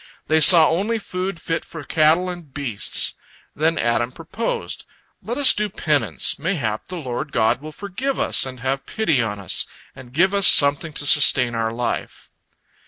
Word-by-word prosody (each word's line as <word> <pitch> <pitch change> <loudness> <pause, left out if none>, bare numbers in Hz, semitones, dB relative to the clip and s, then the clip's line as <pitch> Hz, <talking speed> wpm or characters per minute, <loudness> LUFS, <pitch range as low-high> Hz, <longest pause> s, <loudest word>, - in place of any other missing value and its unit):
They 160 0 +2
saw 160 0 +7
only 205 +7 -1
food 185 -3 -5
fit 165 0 -3
for 160 -3 -10
cattle 160 +5 +2
and 175 -5 -8
beasts. 130 -7 +1 0.4
Then 160 +2 0
Adam 120 +1 0
proposed: 165 - -5 0.3
"Let 240 +3 -5
us 285 -2 +5
do 210 0 -2
penance, 140 - 0
mayhap 140 - -3
the 185 - -7
Lord 135 -1 -5
God 115 0 +1
will 155 +1 -9
forgive 205 - -5
us - - +3
and 130 -2 -4
have 135 +2 -3
pity 160 - 0
on 105 -3 -4
us, 95 -4 +1 0.3
and 130 -2 -13
give 185 +8 +2
us 200 -1 +5
something 145 +2 +4
to 145 - -3
sustain 130 -4 +4
our 115 -1 -2
life." 120 +1 -5
155 Hz, 170 wpm, -20 LUFS, 125-180 Hz, 0.4 s, saw